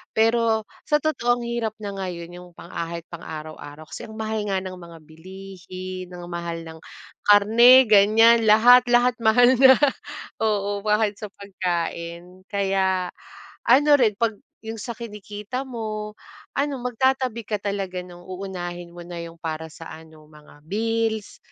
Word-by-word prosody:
Pero, 225 0 +2 0.2
sa 300 -1 +3
totoo 245 -6 +1
ang - - -6
hirap 235 -2 -2
na 200 - -4
ngayon 175 -3 -6
yung 180 0 -11
pang 170 - -12
kahit 170 0 -5
pang-araw-araw 155 -2 -9
kasi - - -7
ang 220 - -11
mahal 220 0 -2
nga 195 -1 0
ng 185 -1 -7
mga 170 -1 -12
bilihin, 185 +2 -9
ang 175 0 -9
mahal 170 -1 -4
ng 160 0 -11 0.5
karne 225 +5 +7
ganyan, 220 +2 +5
lahat-lahat 245 +2 +6
mahal 235 +2 +5
na, 265 0 +8 0.7
oo 205 -2 0
kahit 210 -1 +1
sa 210 - -6
pagkain. 175 -2 -5
Kaya, 190 -2 0 0.6
ano 280 +5 +5
rin 225 -4 +4
'pag 230 -1 +1 0.3
yung 225 0 -5
sa 235 - -5
kinikita 210 +1 -7
mo 215 -4 -5 0.5
ano 280 0 0
magtatabi 250 -2 0
ka 215 - 0
talaga 195 -3 -3
nung 175 -1 -14
uunahin 175 -2 -6
mo 175 - -11
na 175 0 -8
yung 165 0 -10
para 160 -1 -5
sa 165 - -11
ano 160 -1 -13
mga 150 -1 -18
bills, 220 +1 -2
200 Hz, 145 wpm, -23 LUFS, 175-225 Hz, 0.7 s, na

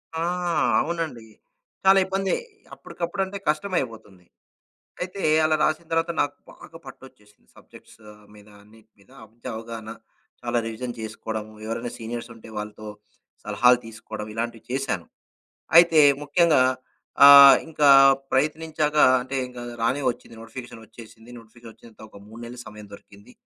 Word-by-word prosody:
ఆ! 160 - -3 0.6
అవునండి. 160 -9 -5 0.6
చాలా 195 0 +6
ఇబ్బందే. 195 0 -1 0.4
అప్పటికప్పుడంటే 190 +3 -5
కష్టమయిపోతుంది. 125 - -4 0.8
అయితే, 185 +2 -6 0.2
అలా 155 0 +2
రాసిన 155 +2 -1
తర్వాత 165 +1 0
నాకు 145 0 -2 0.2
బాగా 165 - -14
పట్టోచ్చేసింది 130 -6 -16
సబ్జెక్ట్సు - - -18 0.3
మీద 105 0 -17 0.2
అన్నిటి 110 +1 -22
మీద 100 - -25 0.2
అబ్జ 115 +2 -29
అవగాహన. 115 -1 -8 0.5
చాలా 120 - -1
రివిజన్ 115 +2 -6
చేసుకోవడంము, 110 0 -6
ఎవరైనా 115 +2 -5
సీనియర్సుంటే 115 0 -8
వాళ్ళతో 105 0 -7 0.6
సలహాలు 125 0 +3
తీసుకోవడం, 110 -1 -9
ఇలాంటివి 115 0 -5
చేశాను. 125 - -3 0.7
అయితే, 170 -2 +6 0.2
ముఖ్యంగా 155 -1 +3 0.6
ఆహ్, 140 -1 +10
ఇంకా 150 -2 +2 0.4
ప్రయత్నించాక 155 +2 -1 0.3
అంటే, 130 +2 -6
ఇంగా 125 -1 -10 0.2
రానే 130 +5 0
ఒచ్చింది. 120 - -11
నోటిఫికేషన్ 115 0 -10
ఒచ్చేసింది, 115 +1 -15
నోటిఫికేషన్ 115 0 -15
ఒచ్చినంత 110 0 -19
ఒక 105 - -15
3 110 +2 -13
నెలలు 120 +1 -10
సమయం 105 -1 -11
దొరికింది. 100 0 -16
120 Hz, 120 wpm, -23 LUFS, 110-155 Hz, 0.8 s, ఆహ్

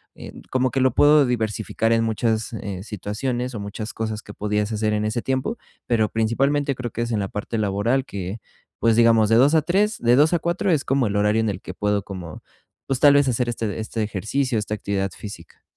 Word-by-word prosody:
em, - - -10
como 130 0 +1
que 135 - -1
lo 130 -2 +3
puedo 145 +1 +6
diversificar 115 -2 -1
en 115 0 +3
muchas, 110 0 -1
eh, 100 -4 -5
situaciones, 120 +5 -3
o - - -4
muchas 100 +2 -6
cosas 110 -1 -4
que 105 - -11
podías 105 +1 -1
hacer 110 0 0
en 105 0 0
ese 110 +2 -1
tiempo, 130 - -2 0.3
pero 110 -3 +2
principalmente 135 +6 +1
creo 125 -2 -5
que 115 - -4
es 120 0 -2
en 110 - 0
la 100 - -1
parte 105 +3 -4
laboral 110 +6 0
que, 100 -2 -5 0.4
pues, 115 0 +3
digamos, 115 -2 +5
de 115 - +4
2 135 +6 +5
a 155 - +4
3, 205 +6 +1
de 120 +1 +4
2 150 +4 +4
a 170 - +2
4 175 +4 0
es 150 -4 +1
como 135 -3 +1
el 100 - -3
horario 105 +2 +2
en 110 - 0
el 95 -2 -4
que 95 - -8
puedo 105 +1 0
como, 90 -5 -8 0.5
pues, 135 -2 -1
tal 145 -1 +7
vez 140 -1 +4
hacer 125 -1 0
este 115 -3 -3
este 110 +1 -4
ejercicio, 110 +5 -1
esta 105 0 -4
actividad 100 -2 -2
física. 100 -5 -10
115 Hz, 220 wpm, -23 LUFS, 105-130 Hz, 0.5 s, tal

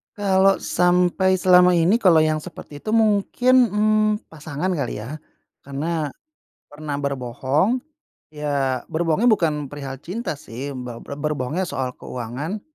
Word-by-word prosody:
Kalau 195 -1 +3
sampai 180 +1 +2
selama 180 -1 +5
ini 175 +8 +3
kalau 170 -7 +5
yang 155 0 +1
seperti 145 -1 -10
itu 215 +8 -3
mungkin, 225 +4 +3
mmm, 215 0 +1
pasangan 160 +3 -4
kali 140 -10 -3
ya, 150 +6 -7 0.5
karena 150 +3 -2 0.6
pernah 145 -1 -5
berbohong, 140 - 0 0.5
ya 140 -4 -2
berbohongnya 165 +6 0
bukan 155 -8 +1
perihal 135 -1 -7
cinta 180 - -5
sih 135 +2 -7
be 125 -2 -7
ber 140 - -7
berbohongnya 150 +3 -2
soal 130 -5 -3
keuangan. 130 - -5
155 Hz, 125 wpm, -22 LUFS, 140-190 Hz, 0.6 s, selama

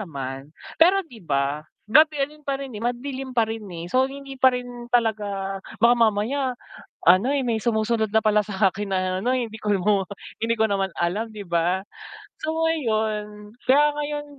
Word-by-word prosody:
naman. 135 -6 -6 0.3
Pero, 380 +3 +5
'di 245 -9 -14
ba, 140 -1 -1 0.2
gabi 305 +7 +5
rin 300 +1 -15
pa 275 -1 -1
rin, 275 -2 -7
eh. 210 - -7
Madilim 260 +2 -3
pa 230 - +5
rin, 225 0 -5
eh. 170 -2 -7
So, 260 +1 +3
hindi 275 0 -9
pa 260 - +7
rin 245 -1 -8
talaga 205 -5 0 0.2
baka 235 +2 +6
mamaya 240 +4 +1 0.5
ano, 185 +9 +6
eh, 285 - +1
may 230 -2 +1
sumusunod 220 -1 +1
na 220 - +5
pala 215 -1 +3
sa 195 0 +2
akin 205 +1 -5
na 190 - +2 0.3
ano, 250 - +2
eh, 255 -2 0
hindi 220 - -9
hi 210 -1 +1
mo 200 0 +2 0.4
hindi 230 0 +2
ko 220 - +4
naman 195 -1 0
alam, 205 +7 -1
'di 205 -2 -8
ba? 170 +2 +1 0.6
So, 310 - -1
ngayon 215 -8 -2 0.2
kaya 290 +3 +6
ngayon 295 0 -3
220 Hz, 185 wpm, -24 LUFS, 200-260 Hz, 0.6 s, pa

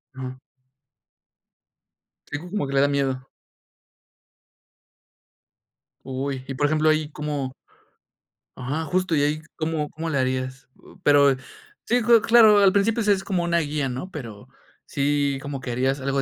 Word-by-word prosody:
Ajá. 130 -1 -6 1.9
Sí, 145 - -4
como 180 -2 -4
que 135 - -5
le 135 - +4
da 140 - +4
miedo. 135 -2 -1 2.8
Uy, 135 0 -4
y, 135 - -5
por 145 - +1
ejemplo, 155 +1 +2
ahí 155 -1 +1
¿cómo? 145 -3 -3 1.1
Ajá, 135 +6 -3
justo, 180 +2 0
¿y 145 - +2
ahí 150 +1 0
cómo 155 -2 -2
cómo 165 +1 -5
le 145 - -1
harías? 130 0 -2 0.4
Pero, 140 -2 +5 0.5
sí, 245 +1 +2
cla 235 -1 +5
claro, 220 -2 +6
al 195 -2 +5
principio 210 +3 +2
si 210 -1 +2
es 195 -1 +1
como 190 -3 -1
una 170 0 +1
guía, 150 -3 -2
¿no? 130 +9 -5
Pero 115 - -9 0.4
sí, 140 -1 0
como 140 -2 -6
que 125 - -5
harías 130 +3 0
algo 135 +1 0
145 Hz, 145 wpm, -24 LUFS, 135-170 Hz, 2.8 s, claro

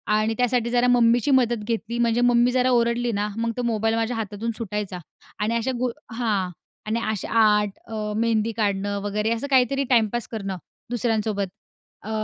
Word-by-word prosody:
आणि 215 +1 +1
त्यासाठी 245 -1 +1
जरा 245 +1 +2
मम्मीची 240 +2 +4
मदत 240 -4 +2
घेतली. 230 +1 -3
म्हणजे 235 0 +2
मम्मी 245 0 +4
जरा 255 0 +2
ओरडली 235 0 +2
ना, 205 +1 0
मग 230 0 0
तो 245 - -1
मोबाईल 225 -1 +1
माझ्या 230 +2 -1
हातातून 215 +1 -3
सुटायचा 210 -4 -4 0.4
आणि 215 +2 0
अशा 235 +3 0
गु 250 0 +1 0.2
हां. 215 -6 0 0.4
आणि 225 +2 0
अशा 215 -3 -3
आर्ट, 210 -2 +4 0.2
अ, 215 -1 -4
मेहंदी 225 -1 +1
काढणं 200 -1 0
वगैरे, 210 +2 -1
असं 230 +5 -2
काहीतरी 270 +1 +3
टाइमपास 235 -1 +2
करणं 195 -4 -4 0.3
दुसऱ्यांसोबत. 220 -4 0 0.5
अ, 215 - -9
230 Hz, 165 wpm, -24 LUFS, 210-240 Hz, 0.5 s, मम्मीची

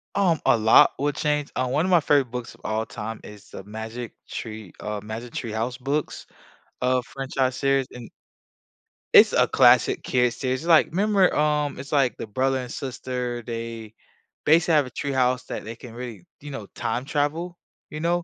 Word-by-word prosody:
Um, 175 -6 +2
a - - +5
lot 110 +1 +6
would 145 0 0
change, 150 -2 -1
um, 125 0 -1
one 155 +5 +1
of 185 - -1
my 175 -2 +6
favorite 140 -4 +2
books 125 -1 -6
of - - -20
all 110 +1 -1
time 110 0 -7
is 105 -1 -13
the 95 - -9
Magic 110 +3 -7 0.2
Tree, 110 -4 -7
uh, 105 0 -3
Magic 110 +3 -7
Tree 115 -3 -4
House 120 +3 -2
books, 140 +3 -3 0.5
uh, 125 0 +2
franchise 135 -1 -1
series, 135 -1 +2
and 120 -2 -10 1.0
It's - - +8
a - - +5
classic - - +4
kids 125 -1 +1
series, 130 0 -1
it's 165 - -7
like, 160 - +6
remember, 195 +1 +2
um, 150 -1 +1
it's 135 +3 -9
like 135 -4 +2
the - - -6
brother 130 +5 0
and 125 -1 -6
sister, 125 -2 -4
they 115 -2 -6 0.5
basically 165 +1 +4
have 145 -3 +4
a - - -8
tree 140 +2 -4
house 125 -1 +1
that - - -5
they 115 +1 -6
can 120 0 -12
really, 120 -6 -8 0.2
you 145 - -9
know, 135 -8 -7
time 120 +2 -2
travel, 155 +5 -2 0.3
you 150 - -6
know? 170 +2 0
130 Hz, 190 wpm, -24 LUFS, 115-145 Hz, 1.0 s, It's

